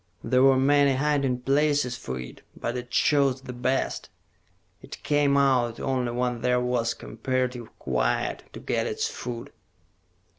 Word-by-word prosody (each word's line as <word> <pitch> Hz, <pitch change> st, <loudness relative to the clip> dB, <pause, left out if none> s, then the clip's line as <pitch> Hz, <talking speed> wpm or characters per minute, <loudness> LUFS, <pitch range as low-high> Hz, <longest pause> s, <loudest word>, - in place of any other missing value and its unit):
"There 125 Hz, 0 st, +2 dB
were 135 Hz, 0 st, +6 dB
many 140 Hz, +1 st, +4 dB
hiding 140 Hz, -3 st, 0 dB
places 140 Hz, -1 st, +1 dB
for 65 Hz, -, -5 dB
it, 65 Hz, -, -9 dB, 0.2 s
but 120 Hz, -, -3 dB
it 125 Hz, 0 st, -5 dB
chose 135 Hz, -2 st, +2 dB
the 125 Hz, -, -7 dB
best. 130 Hz, +2 st, -1 dB, 0.7 s
It -, -, -11 dB
came 145 Hz, -1 st, +2 dB
out 125 Hz, -4 st, +2 dB
only 130 Hz, -2 st, -1 dB
when 125 Hz, -1 st, -1 dB
there 125 Hz, 0 st, +2 dB
was 125 Hz, -2 st, 0 dB
comparative 125 Hz, 0 st, -3 dB
quiet, -, -, -1 dB
to -, -, -8 dB
get -, -, -1 dB
its -, -, -1 dB
food...." 120 Hz, -1 st, -6 dB
125 Hz, 145 wpm, -26 LUFS, 120-140 Hz, 0.7 s, were